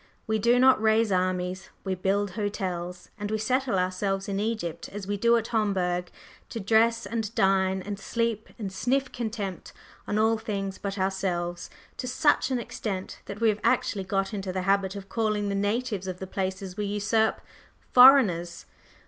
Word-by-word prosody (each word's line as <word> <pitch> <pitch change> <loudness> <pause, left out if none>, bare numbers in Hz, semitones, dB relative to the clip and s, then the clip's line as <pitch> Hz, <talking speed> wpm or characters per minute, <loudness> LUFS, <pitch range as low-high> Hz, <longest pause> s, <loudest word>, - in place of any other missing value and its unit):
We 220 0 0
do 235 +4 +4
not 260 -2 +5
raise 220 -1 +3
armies, 185 0 -1
we 190 - -1
build 195 +2 0
hotels; 180 -4 -4
and 205 0 -3
we 220 - 0
settle 250 0 0
ourselves 190 +1 -1
in 200 -1 -2
Egypt 215 -6 -3
as 205 -1 -7
we 205 +1 -2
do 235 +3 +4
at 225 0 -3
Homburg, 185 -5 0 0.4
to 230 - -5
dress 230 +3 +3
and 225 -2 -2
dine 190 -1 +2
and 205 0 -5
sleep 230 0 -2
and 200 -5 -5
sniff 255 +7 0
contempt 215 -6 -5 0.3
on 205 - -1
all 220 +1 +3
things 200 -3 -4
but 200 0 -4
ourselves, 185 -2 -2 0.3
to 250 - -4
such 295 +4 +2
an 260 - 0
extent 200 -5 -5
that 200 +2 -8
we 225 - +5
have 210 0 -1
actually 195 -3 +1
got 195 +1 -1
into 195 -2 -3
the 185 0 -2
habit 195 0 +1
of 195 -1 -7
calling 215 -2 0
the - - -1
natives 205 0 -1
of 185 -1 -4
the 190 - -6
places 190 0 -4
we 210 - -2
usurp 210 +2 +1 0.5
"foreigners." 210 -11 +6
200 Hz, 175 wpm, -27 LUFS, 190-225 Hz, 0.5 s, foreigners